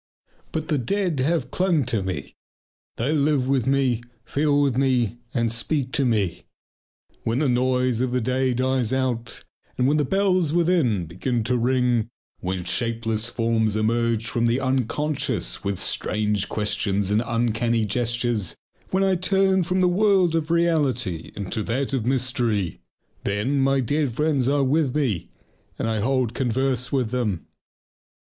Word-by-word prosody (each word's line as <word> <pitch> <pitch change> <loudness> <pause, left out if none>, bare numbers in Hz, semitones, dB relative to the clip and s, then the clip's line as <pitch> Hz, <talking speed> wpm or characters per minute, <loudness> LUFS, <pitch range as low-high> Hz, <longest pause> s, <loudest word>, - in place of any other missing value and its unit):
But 160 -1 -3
the 150 -3 +2
dead 175 - -1
have 135 -2 0
clung 175 -7 +1
to 115 -4 0
me. 95 -1 -5 0.6
They 130 +7 -1
live 145 -3 +2
with 130 -3 +1
me, 135 -4 +2 0.2
feel 145 0 +1
with 140 -4 +2
me, 125 -4 +1
and 115 -3 0
speak 130 +3 -1
to 140 - +1
me. 105 -8 0 0.8
When 115 +1 0
the 145 +1 +2
noise 125 -1 +1
of 130 - +1
the 125 - +1
day 130 +1 0
dies 130 -2 0
out 130 -3 -2 0.3
and 125 - +2
when 150 +2 +3
the 150 - +2
bells 185 -1 +1
within 165 - +2
begin 115 +8 -2
to 125 +3 0
ring, 125 -2 +1 0.3
when 90 0 -3
shapeless 115 +2 -1
forms 115 -2 0
emerge 115 +1 +1
from 120 -1 0
the 120 +3 +1
unconscious 130 - -1
with 100 -1 -1
strange 105 0 0
questions 105 -2 -1
and 105 +2 +3
uncanny 115 -1 0
gestures, 120 -2 -1 0.3
when 190 +1 +1
I 190 -1 +3
turn 190 +1 +2
from 185 +2 0
the 180 - +4
world 190 -2 +3
of 160 -1 -1
reality 145 - 0
into 105 +2 -3
that 135 +4 -1
of 120 -4 -1
mystery, 120 -7 0 0.4
then 105 +8 0
my 135 0 +3
dead 145 +2 0
friends 140 -1 +1
are 140 0 +2
with 140 0 +1
me 125 - -1 0.5
and - - -2
I 110 -1 0
hold 125 +1 0
converse 130 0 0
with 130 -5 0
them. 110 -9 -1
125 Hz, 155 wpm, -24 LUFS, 115-145 Hz, 0.8 s, the